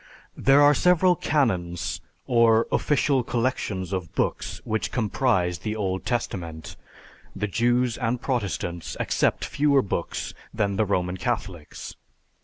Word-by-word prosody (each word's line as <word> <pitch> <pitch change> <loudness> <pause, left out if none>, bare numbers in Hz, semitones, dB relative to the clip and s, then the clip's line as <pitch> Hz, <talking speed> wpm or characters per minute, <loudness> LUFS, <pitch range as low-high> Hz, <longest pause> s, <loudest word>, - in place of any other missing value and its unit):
There 140 +2 +5
are 145 0 +7
several 180 +3 +4
canons, 95 - -1 0.2
or 115 -1 +4
official 140 -2 +2
collection 115 -6 -1
of 90 -3 -4
books - - -2
which 105 -5 -2
comprise 105 -7 0
the 105 +5 -3
Old 95 -3 -2
Testament. 85 -10 -3 0.6
The 105 - -2
Jews 120 +3 +1
and 125 0 -1
Protestants 100 - -3
accept - - +1
fewer 140 -2 +2
books 100 - -3 0.2
than 100 -1 -1
the 110 - +2
Roman 90 -2 -1
Catholics. 95 -8 -4
110 Hz, 120 wpm, -25 LUFS, 95-125 Hz, 0.6 s, are